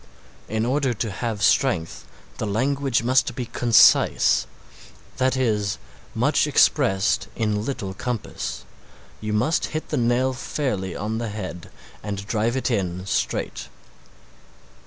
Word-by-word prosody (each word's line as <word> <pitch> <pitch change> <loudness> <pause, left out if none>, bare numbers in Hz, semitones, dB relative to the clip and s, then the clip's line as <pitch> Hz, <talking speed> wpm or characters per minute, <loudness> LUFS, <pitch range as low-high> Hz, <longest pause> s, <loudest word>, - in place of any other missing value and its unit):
In 110 +1 0
order 130 -1 0
to 110 0 -3
have 110 +1 -3
strength 95 - +1 0.3
the 110 - -2
language 130 +3 0
must 125 -1 +2
be 125 - -3
concise, 115 -1 +4 0.7
that 130 0 +1
is, 105 -6 0 0.4
much - - +2
expressed 95 +1 +3
in 105 -2 -1
little 105 -7 -4
compass, 120 +2 -4 0.5
you 110 0 -4
must 120 +10 +1
hit 155 - -6
the 150 - -1
nail 125 +2 +2
fairly 105 - -3
on 110 +2 -3
the 115 -1 -3
head 95 -5 -6 0.3
and 100 -1 -5
drive 115 +4 0
it 130 - -1
in 95 -4 -2
straight. - - -2
110 Hz, 125 wpm, -23 LUFS, 100-130 Hz, 0.7 s, concise